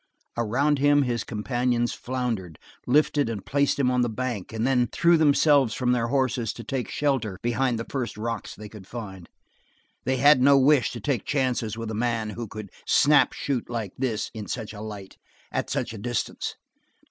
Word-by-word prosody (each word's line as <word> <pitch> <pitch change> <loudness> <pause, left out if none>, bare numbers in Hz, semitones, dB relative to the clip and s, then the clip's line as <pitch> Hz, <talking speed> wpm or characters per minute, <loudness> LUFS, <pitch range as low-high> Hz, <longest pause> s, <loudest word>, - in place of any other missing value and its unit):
Around 135 +6 +1
him 145 0 +4
his 120 -2 -1
companions 120 +2 -1
floundered, 120 - -3 0.3
lifted 145 0 +3
and 105 -4 -5
placed 140 0 +1
him 130 -3 +2
on 125 0 +2
the 120 - +1
bank, 115 -3 -4
and 110 +1 -2
then 125 -2 +2
threw 170 +9 +3
themselves 145 -5 +4
from 125 -1 +1
their 120 -2 +1
horses 125 -4 0
to 115 - -9
take 130 +2 -3
shelter 130 -10 -1
behind 120 +1 +1
the 115 - -4
first 125 -6 -4
rocks 115 0 -4
they 105 +1 -9
could 100 -3 -12
find; 95 -7 -8 0.7
they 130 0 0
had 140 +1 +6
no 140 +1 +6
wish 135 0 +4
to 120 - -6
take 120 0 -1
chances 125 -6 -1
with 115 -1 -4
a - - -4
man 115 -1 -1
who 115 +2 -6
could 105 -1 -8 0.2
snap 150 +1 +5
shoot 135 -5 -3
like 115 -5 -4
this 125 -5 -2
in 110 -3 -7
such 110 -3 -5
a 105 - -8
light, 105 -3 -8 0.3
at - - -2
such - - -2
a 110 - -7
distance. 120 +3 -3
120 Hz, 185 wpm, -25 LUFS, 110-135 Hz, 0.7 s, had